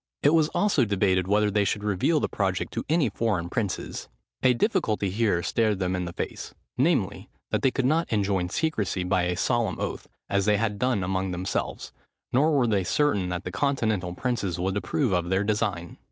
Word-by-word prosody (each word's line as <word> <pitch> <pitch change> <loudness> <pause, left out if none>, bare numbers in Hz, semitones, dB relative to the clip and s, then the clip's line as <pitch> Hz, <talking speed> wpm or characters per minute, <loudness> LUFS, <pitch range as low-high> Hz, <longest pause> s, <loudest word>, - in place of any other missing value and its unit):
It 145 - +5
was 160 -2 +4
also 200 -10 +2
debated 95 -3 +1
whether 105 +1 +2
they 105 0 +2
should 100 +1 -1
reveal 105 - +2
the - - 0
project 95 -3 -2
to - - -2
any 160 -3 +3
foreign 100 -5 -1
princes. 100 -2 -3 0.3
A 125 -1 +4
difficulty 115 - 0
here 100 -4 +1
stared 110 +2 +1
them 90 -1 -1
in 90 -1 -2
the 85 - -6
face, - - -5 0.2
namely, 130 - 0 0.2
that - - +1
they 135 - +4
could 130 0 -1
not 160 +5 +1
enjoin 100 -4 0
secresy 105 - -1
by 90 -1 +2
a 90 0 -1
solemn 115 -6 0
oath, - - -4 0.2
as 100 -1 +1
they 105 -1 +3
had 105 -1 -1
done 125 -6 +1
among 95 +1 -1
themselves: 90 +2 -3 0.4
nor 145 +6 +4
were 130 - +3
they 105 -4 +1
certain 100 -2 +1
that 90 +1 -3
the 90 - -5
continental 110 -9 0
princes 100 -7 -2
would 95 +2 -1
approve 100 - 0
of 90 -1 0
their 95 +2 +2
design. 105 -5 -2
105 Hz, 195 wpm, -26 LUFS, 95-125 Hz, 0.4 s, It